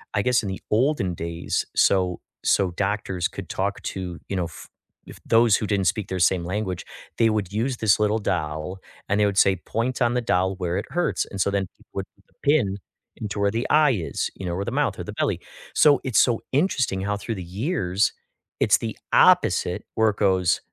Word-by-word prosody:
I 105 - +3
guess 125 +1 +3
in 105 - -4
the 95 - -5
olden 110 -5 +2
days, 85 0 -3
so 90 -2 +2 0.2
so 95 -2 +2
doctors 95 -1 -1
could - - -9
talk 100 +1 -2
to, 90 -2 -5
you 100 - -2
know, 90 -2 0
f 85 -1 -10 0.4
if - - -12
those 115 -2 +5
who 105 - -3
didn't 100 -2 0
speak 105 0 0
their 95 - -2
same 90 0 +3
language, 95 0 -3 0.3
they 115 -1 +4
would 105 -3 -2
use 120 +4 -1
this 110 -3 +3
little 105 +1 +2
doll, 85 -1 -3 0.3
and 100 +1 +1
they 105 - +4
would 100 -1 -2
say 95 -1 +5
point 115 +7 -3
on 120 0 +2
the 125 - +1
doll 95 -4 +1
where 90 -1 -2
it 105 - -3
hurts, 175 0 0
and 100 - -8
so 100 - +2
then 100 -2 0
people - - -23
would - - -3
put - - -29
the - - -32
pin 120 -10 +2 0.4
into 105 -1 -5
where 100 0 +2
the 115 +3 -2
eye 150 -2 +5
is, 90 -10 -2
you 95 - -7
know, 85 - -2
or 95 +3 -2
the - - -3
mouth - - 0
or - - -3
the - - -7
belly. - - -1 0.3
So, 145 -2 +5
it's 130 -5 +2
so 120 -3 +3
interesting 130 - +1
how 100 +1 -1
through 115 +2 -4
the 95 - -6
years, 100 - 0 0.5
it's - - +4
the - - -5 0.2
opposite - - +4
where 110 -1 +4
it 100 - -4
goes, 95 -4 +2
100 Hz, 215 wpm, -24 LUFS, 95-115 Hz, 0.5 s, those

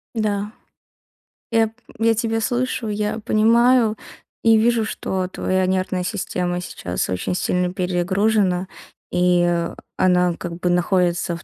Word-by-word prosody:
Да. 210 -2 -1 1.0
Я 225 -1 +3
п 220 - -14 0.3
я 225 0 +4
тебя 225 0 -1
слышу, 245 0 -1
я 210 +1 -2
понимаю 230 +2 +3 0.5
и 225 -1 +6
вижу, 230 0 +2
что 190 -4 -3
твоя 185 0 -1
нервная 185 -1 -1
система 180 -2 -2
сейчас 90 - -4
очень 90 - -2
сильно 180 0 0
перегружена 185 +1 +1 0.4
и, 180 0 +3
э, 170 -1 -1 0.2
она 180 -1 +3
как 170 -1 -6
бы 180 - 0
находится 175 -1 +1
в 170 - -14
190 Hz, 130 wpm, -21 LUFS, 180-220 Hz, 1.0 s, и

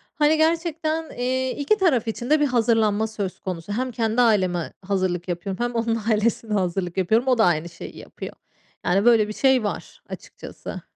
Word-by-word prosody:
Hani, 305 +1 +3
gerçekten, 325 -1 0
eee, 260 +1 0
iki 290 +10 +2
taraf 295 - +2
için 240 +3 -4
de 305 +1 +4
bir 295 - +3
hazırlanma 225 -4 +2
söz 200 -4 -5
konusu 180 0 -6
hem 255 +3 -2
kendi 225 +1 0
aileme 185 -7 +1
hazırlık 185 -3 -1
yapıyorum 185 +5 -3
hem 240 0 -2
onun 230 0 0
ailesine 220 0 0
hazırlık 180 -2 -1
yapıyorum. 220 +7 +2
O 255 -2 +3
da 220 - +5
aynı 170 -1 +1
şeyi 165 - -10
yapıyor. - - -9 0.5
Yani, 195 +4 +2
böyle 230 -3 +5
bir 215 - -5
şey 265 -1 +3
var 205 - -5
açıkçası. - - -9
225 Hz, 175 wpm, -23 LUFS, 190-260 Hz, 0.5 s, da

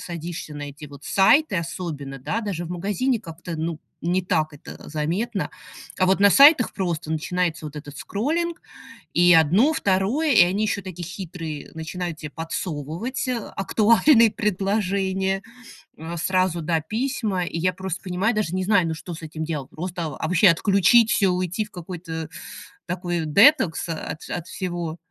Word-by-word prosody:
садишься 170 -2 -6
на 145 - -6
эти 150 +2 -11
вот 145 0 -13
сайты, 200 +3 +4
особенно, 155 -5 -5
да, 220 - -2
даже 190 -5 -4
в 170 - -8
магазине 205 +7 -1
как-то, 170 -2 -8
ну, 160 0 -3 0.2
не 180 +2 +1
так 155 -3 0
это 145 - -11
заметно. 170 +5 -2 0.5
А 185 - +3
вот 190 +1 +2
на 200 0 +7
сайтах 280 - +7
просто 170 -4 -3
начинается 165 0 -1
вот 150 0 -9
этот 145 -1 -9
скроллинг, 330 +10 -2 0.5
и 175 0 +6
1, 190 - +4
2, 225 +8 +1
и 205 - +8
они 190 +4 +1
ещё 205 -1 -1
такие 180 -2 -7
хитрые, 165 -5 -7
начинают 170 +1 -5
те 155 -2 -7
подсовывать 165 - -4 0.3
актуальные 225 +4 +4
предложения, 195 -1 0 0.6
а, 165 +2 -6
сразу, 185 0 +1
да, 160 0 0
письма. 215 - -2
И 165 - -4
я 185 +2 +1
просто 190 0 -5
понимаю, 190 +5 0
даже 205 -6 -1
не 185 0 -1
знаю, 200 -4 +3
ну 160 - -1
что 170 +2 -8
с 165 - -9
этим 155 0 -5
делать. 150 -5 -4
Просто 175 0 -4
вообще 180 +4 +4
отключить 200 +6 +4
всё, 195 - +3
уйти 185 +3 -1
в - - -19
какой-то 165 -2 -6 0.6
такой 175 -2 -2
детокс 185 - +4
от 160 -1 -5
от 175 -2 -4
всего. 175 -3 -4
180 Hz, 160 wpm, -23 LUFS, 160-200 Hz, 0.6 s, и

